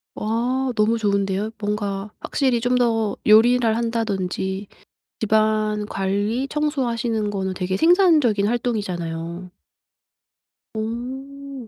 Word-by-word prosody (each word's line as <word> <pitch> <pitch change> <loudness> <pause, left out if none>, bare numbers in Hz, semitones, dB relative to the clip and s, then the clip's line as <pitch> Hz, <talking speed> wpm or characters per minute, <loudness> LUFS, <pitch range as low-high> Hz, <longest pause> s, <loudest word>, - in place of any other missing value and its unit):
와 245 +4 -1
너무 220 +1 +2
좋은데요. 200 -1 0
뭔가 205 -1 -3
확실히 260 -4 0
좀 245 +1 +1
더 225 -4 +1
요리를 225 +1 +5
한다든지 200 -4 -2 0.5
집안 215 -1 +1
관리, 205 +7 -1
청소하시는 240 -8 -1
거는 190 -2 -2
되게 185 0 -2
생산적인 310 - +4
활동이잖아요. 180 -7 -3 1.3
어 260 +4 -6
220 Hz, 230 characters per minute, -22 LUFS, 200-245 Hz, 1.3 s, 요리를